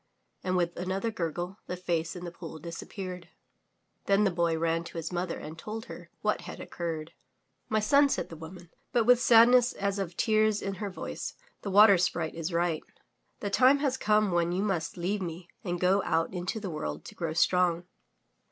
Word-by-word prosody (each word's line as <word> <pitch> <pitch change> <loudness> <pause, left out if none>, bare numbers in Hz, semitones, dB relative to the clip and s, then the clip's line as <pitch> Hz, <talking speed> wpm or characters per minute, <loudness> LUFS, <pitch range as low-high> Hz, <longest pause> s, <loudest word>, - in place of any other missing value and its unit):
And 185 0 0
with 175 -1 0
another 190 +5 -2
gurgle, 175 0 -3
the 180 - -4
face 170 -2 -2
in 180 0 -7
the 175 - -5
pool 170 -2 -9
disappeared. 175 +2 -7 0.8
Then 200 +1 +4
the 195 - +3
poy 170 -1 +1
ran 165 +1 0
to 170 - -8
his 165 +1 -4
mother 180 0 -2
and 155 +2 -8
told 220 +4 -6
her - - -10
what - - 0
had - - -8
occurred. 165 -1 -5 0.6
"My 215 - +2
son," 280 +7 +4
said - - -1
the 165 - -8
woman, 165 +2 -11 0.2
but 240 - +4
with 245 +1 +5
sadness 245 +1 +6
as 200 0 -2
of 180 -3 -4
tears 215 -1 +3
in 195 - -3
her 205 - -2
voice, 185 - -6 0.3
"the 200 - -4
Water 200 -1 +7
Sprite 170 -2 0
is 165 +1 -4
right. 170 -2 0 0.6
The 205 - -2
time 260 +6 +6
has 275 -2 0
come 215 -4 +2
when 170 0 +1
you 185 +3 0
must 180 -4 -2
leave 190 +4 -1
me 170 0 -6 0.2
and 175 -2 -2
go 190 +3 +3
out 165 +3 0
into 180 +4 -3
the 200 -4 -5
world 75 - -5
to - - -9
grow 165 -2 -3
strong." 175 0 +2
180 Hz, 195 wpm, -29 LUFS, 170-205 Hz, 0.8 s, Water